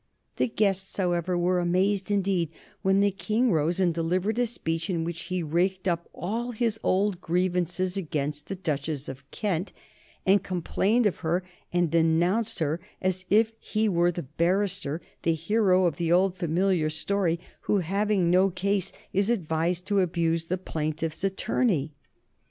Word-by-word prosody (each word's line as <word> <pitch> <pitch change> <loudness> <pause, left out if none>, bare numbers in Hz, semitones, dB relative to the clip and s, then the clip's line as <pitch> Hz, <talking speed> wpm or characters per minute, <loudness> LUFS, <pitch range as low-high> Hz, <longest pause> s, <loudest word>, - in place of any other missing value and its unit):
The - - +2
guests, 195 -4 0
however, 175 -1 0
were 180 +1 +2
amazed 190 +3 +1
indeed 195 -5 +1 0.3
when 195 +1 +3
the 200 0 +3
King 220 +5 +1
rose 165 +2 +1
and 180 -3 +3
delivered 180 +7 0
a 245 - +3
speech 165 -5 -3
in 170 -3 0
which 170 0 -4
he 180 -1 -2
raked 185 +4 0
up 170 -1 -1
all 235 +7 -3
his 220 -1 0
old 190 -1 +1
grievances 180 +1 0
against 150 -4 -3
the 195 - -4
Duchess 150 -5 -3
of 135 +1 -9
Kent, 195 -3 -2 0.5
and 195 0 +5
complained 195 +5 +1
of 205 - +1
her 175 +2 -1 0.3
and 175 -3 +1
denounced 175 +7 +2
her 160 -1 0 0.2
as 185 0 -1
if 220 +2 +4
he 220 0 0
were 175 -3 +3
the 175 0 -5
barrister, 170 +2 0 0.2
the 165 - +2
hero 185 +2 +3
of 170 - 0
the 170 -1 0
old 185 +1 +3
familiar 175 -1 +1
story, 170 +2 0 0.3
who, 210 - +3
having 195 0 +1
no 185 +2 +5
case, 195 +1 -1 0.2
is 200 +3 +2
advised 175 -4 0
to 205 -1 +2
abuse 165 -2 +1
the 185 +3 -1
plaintiff's 160 -1 -3
attorney. 190 - 0
180 Hz, 155 wpm, -27 LUFS, 165-195 Hz, 0.5 s, and